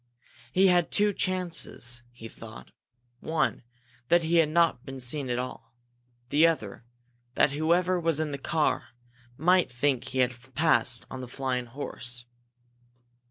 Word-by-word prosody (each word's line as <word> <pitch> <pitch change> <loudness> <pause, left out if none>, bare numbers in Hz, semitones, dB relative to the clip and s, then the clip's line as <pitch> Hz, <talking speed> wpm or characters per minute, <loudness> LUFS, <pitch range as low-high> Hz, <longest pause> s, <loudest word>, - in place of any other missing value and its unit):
He 190 +7 +4
had 180 -3 +4
two 205 0 +2
chances, 175 -11 -2
he 115 -2 -10
thought. 65 - -12 0.5
One, 145 -6 0 0.5
that 175 +3 +4
he 165 +2 +2
had 160 -2 +4
not 160 -6 +2
been 135 -1 -8
seen 130 +2 -2
at 120 - 0
all; 125 -2 -6 0.5
the 155 +4 +5
other, 115 -9 -3 0.5
that - - +4
whoever 170 +5 +2
was 165 -3 +1
in 155 -2 -1
the 140 - -4
car 155 +2 0 0.5
might 180 0 +3
think 130 +1 0
he 130 - -6
had 130 0 -1
passed 150 -6 +2
on 130 - -6
the 125 - -7
flying 125 -1 -2
horse. 120 -1 -5
145 Hz, 145 wpm, -28 LUFS, 125-165 Hz, 0.5 s, the